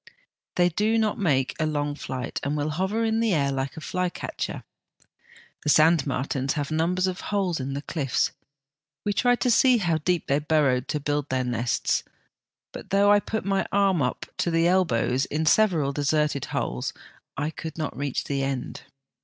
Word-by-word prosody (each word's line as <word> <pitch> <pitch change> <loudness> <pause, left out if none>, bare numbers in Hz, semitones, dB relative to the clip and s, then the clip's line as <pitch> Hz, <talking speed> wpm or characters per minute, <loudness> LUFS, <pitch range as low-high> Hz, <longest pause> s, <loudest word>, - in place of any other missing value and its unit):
They 175 0 +4
do 215 +6 +1
not 220 -2 0
make 135 -9 +1
a 155 - +1
long 145 -1 -1
flight, 130 -3 -5
and 145 +2 -2
will 150 +1 -1
hover 190 +8 -1
in 225 0 +1
the 225 -5 +2
air 140 -2 +1
like 135 +1 -3
a - - -6
flycatcher. 180 +2 -3 1.0
The 150 - -2
sandmartins 140 -4 +2
have 145 -1 -3
numbers 175 +4 +1
of 185 0 -3
holes 190 -6 -1
in 135 +1 -3
the 140 - -4
cliffs. 140 -5 0 0.7
We 205 - +1
tried 245 +3 +2
to 250 - +3
see 250 +2 +5
how 170 -6 +1
deep 175 +1 0
they 140 +1 +1
burrowed 145 -5 +1
to 150 - -1
build 145 0 -2
their 130 -1 0
nests, 120 -1 0 0.7
but - - -9
though 200 +1 +4
I 205 - +6
put 220 -1 -4
my 195 -1 0
arm 195 -2 +3
in 140 -5 +2
up - - -5
to - - 0
the 165 0 +3
elbows 135 -8 +2
in 155 +2 -2
several 160 -7 +3
deserted 145 -1 0
holes, 60 0 -3 0.4
I 150 +2 -1
could 160 0 -7
not 155 -3 -3
reach 140 -1 -2
the 140 -1 -2
end. 135 -2 -3
155 Hz, 180 wpm, -25 LUFS, 140-185 Hz, 1.0 s, I